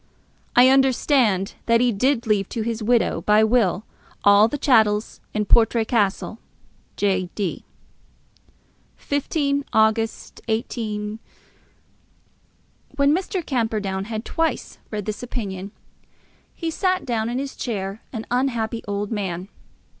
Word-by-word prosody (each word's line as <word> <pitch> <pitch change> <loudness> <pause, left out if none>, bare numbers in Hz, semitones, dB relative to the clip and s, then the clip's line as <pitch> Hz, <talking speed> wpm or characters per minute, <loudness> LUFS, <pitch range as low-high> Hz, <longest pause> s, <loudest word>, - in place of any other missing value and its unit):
I 250 +1 +7
understand 260 -6 +3
that 230 0 +4
he 245 0 +3
did 250 +4 +1
leave 205 -3 +1
to 230 - -3
his 230 0 -3
widow 235 +2 +2
by 210 +1 +4
will 220 -3 +2 0.4
all 205 +1 +6
the 290 - -3
chattels 220 -6 +2
in 210 -1 -1
Portray 230 +1 +4
Castle. 215 0 0 0.6
J. 190 -3 0
D. 200 -5 -3 1.3
15 285 0 -1
August, 220 +1 +1
18. 220 -2 -3 1.8
When 280 +1 +3
Mr. 370 -1 -3
Camperdown 215 -6 -1
had 220 +1 -5
thrice 325 0 -2
read 210 -2 -4
this 215 -1 -4
opinion, 200 -6 -5 0.8
he 330 -1 -3
sat 370 0 0
in 235 0 -1
his 275 0 -4
chair 200 -3 -4
an 225 -3 -5
unhappy 235 -3 -1
old 205 +1 -3
man. 190 -3 -3
225 Hz, 115 wpm, -22 LUFS, 210-250 Hz, 1.8 s, I